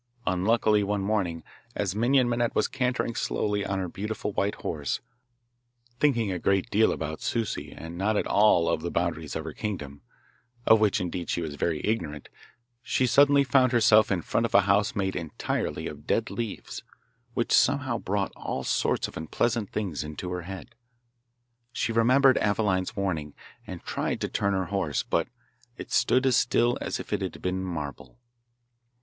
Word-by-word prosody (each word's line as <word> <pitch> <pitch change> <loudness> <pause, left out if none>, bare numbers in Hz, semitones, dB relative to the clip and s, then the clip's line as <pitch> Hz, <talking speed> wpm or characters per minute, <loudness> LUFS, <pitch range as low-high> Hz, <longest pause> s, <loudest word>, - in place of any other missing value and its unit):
Unluckily 105 +3 +2
one 100 0 -1
morning, 95 -6 -1 0.3
as 100 -3 -1
Minon 125 +3 +3
Minette 120 0 0
was - - +2
cantering 125 -2 -1
slowly 105 -2 -1
on 95 - -2
her 95 -1 -2
beautiful 105 +4 -4
white 100 +1 0
horse, 75 -4 -3 1.0
thinking 120 -9 +2
a 90 - -2
great 95 +1 +1
deal 110 +2 +4
about 80 0 -4
Souci 115 -3 -2
and 85 +2 -8
not 105 +2 +1
at - - 0
all 100 -5 +4
of 80 - 0
the 85 - -3
boundaries 85 -3 -2
of - - -3
her - - -6
kingdom 75 -9 -5 0.6
(of 110 - +6
which, 105 -2 +2
indeed, 90 -1 -4
she - - 0
was 75 -2 -4
very 75 +1 -1
ignorant), 80 -10 -2 0.5
she 130 0 +1
suddenly 140 +2 +5
found 130 -1 +3
herself 110 -2 +5
in 90 -4 0
front 115 - 0
of - - -4
a 100 - +8
house 105 +5 +2
made 95 -2 -1
entirely 85 -4 -3
of - - -8
dead 115 - 0
leaves, 115 -4 -5 0.5
which - - -1
somehow - - +3
brought - - -2
all - - -4
sorts - - 0
of - - -12
unpleasant 110 +6 -1
things 95 -9 -3
into 75 +4 -6
her 90 0 -3
head. 95 +1 -9 1.0
She 115 - -1
remembered 130 +4 +4
Aveline's 100 -3 0
warning, 80 -7 -2 0.3
and - - -8
tried - - -2
to - - 0
turn 100 0 0
her 95 -1 0
horse, 90 -8 0
but - - 0 0.5
it - - -9
stood 130 +1 +3
as 130 -2 +4
still 120 +1 +3
as - - -3
if - - -6
it 105 - 0
had 95 - -4
been 95 +1 -2
marble. 80 - -6
100 Hz, 170 wpm, -27 LUFS, 90-115 Hz, 1.0 s, a